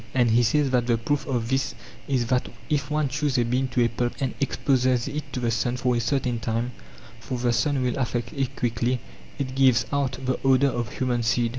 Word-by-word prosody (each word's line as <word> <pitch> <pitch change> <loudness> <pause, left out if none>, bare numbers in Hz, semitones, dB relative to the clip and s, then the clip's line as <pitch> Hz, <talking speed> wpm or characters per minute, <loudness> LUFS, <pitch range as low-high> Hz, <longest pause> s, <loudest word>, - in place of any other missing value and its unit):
And 120 -3 +4
he 120 +2 +5
says 135 +4 +2
that 125 -2 +2
the 120 -2 +3
proof 145 +7 -1
of 120 -4 -1
this 135 +1 0 0.3
is 130 -4 +1
that 125 +1 0 0.2
if 145 -1 0
one 150 -1 +1
chews 135 +1 0
a 120 - +3
bean 125 +3 0
to 125 -1 +1
a - - +4
pulp 120 +1 -2
and 135 -3 -1
exposes 130 -3 +1
it 145 0 -5
to 130 - -3
the 120 -2 0
sun 115 +3 0
for 125 0 +1
a - - +1
certain 125 -2 0
time 115 +2 -1 0.5
(for 125 +2 -4
the 120 0 +1
sun 130 +4 +1
will 125 +2 -1
affect 120 -2 -2
it 135 -1 -2
quickly), 120 +1 0 0.4
it 130 -2 -3
gives 130 -3 +4
out 135 -3 0
the 130 0 0
odour 135 +1 +4
of 120 -3 -3
humanseed. 120 -2 +1
125 Hz, 220 wpm, -25 LUFS, 120-135 Hz, 0.5 s, he